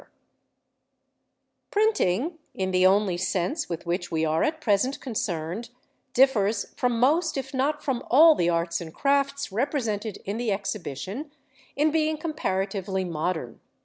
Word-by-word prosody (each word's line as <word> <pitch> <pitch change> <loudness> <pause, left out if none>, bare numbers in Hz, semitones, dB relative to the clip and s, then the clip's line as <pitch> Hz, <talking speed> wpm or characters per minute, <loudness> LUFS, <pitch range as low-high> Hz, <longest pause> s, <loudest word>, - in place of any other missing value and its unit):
PRINTING 410 - +2
Printing, 330 -1 -7 0.2
in 190 -1 -1
the 185 0 +5
only 195 -2 +2
sense 190 - -1
with 170 -2 -5
which 175 +1 -2
we 160 0 0
are 155 +1 +1
at 315 +1 0
present 250 0 +1
concerned, 195 - -3 0.4
differs 225 -6 +2
from 245 -2 0
most 315 +6 +2
if 270 - -5
not 285 +3 0
from 265 -4 -1
all 315 +6 +8
the 175 - +1
arts 170 0 0
and 160 -1 -9
crafts 280 -1 +1
represented 225 -4 -1
in 200 +3 -3
the 235 -2 -1
Exhibition 200 - -4 0.4
in 300 +2 +2
being 310 0 +1
comparatively 195 - -2
modern. 160 -4 -3
215 Hz, 140 wpm, -26 LUFS, 185-280 Hz, 0.4 s, all